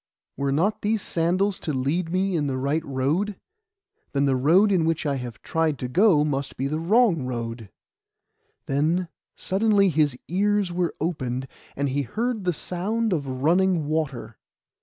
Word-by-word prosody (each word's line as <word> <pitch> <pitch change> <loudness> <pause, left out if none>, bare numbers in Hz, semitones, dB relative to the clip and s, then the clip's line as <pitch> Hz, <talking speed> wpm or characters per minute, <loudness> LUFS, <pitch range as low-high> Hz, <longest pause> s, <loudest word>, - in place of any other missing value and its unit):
Were 140 0 -1
not 180 +10 +1
these 210 0 0
sandals 185 +4 0
to 155 - -3
lead 155 +6 -1
me 190 +1 0
in 150 -3 0
the 130 -1 -2
right 140 +4 0
road? 150 +10 -1 0.8
Then 140 0 +2
the 135 -1 +2
road 170 +11 +4
in 180 -4 +3
which 165 0 0
I 140 -2 0
have 125 -3 -8
tried 160 -3 0
to 125 - -4
go 175 - +4
must 140 -2 -3
be 135 - -2
a 145 +3 -1
wrong 195 - +3
road.' 115 -4 -5 1.0
Then 160 +6 0 0.3
suddenly 200 0 +2
his 150 -5 +1
ears 200 +1 +1
were 175 -1 -1
opened, 135 -6 -2 0.3
and 140 +1 -1
he 140 +2 0
heard 220 - -2
the 180 - +3
sound 205 +7 -2
of 145 -5 -2 0.2
running 175 0 +3
water. 150 -4 -3
160 Hz, 160 wpm, -24 LUFS, 140-190 Hz, 1.0 s, road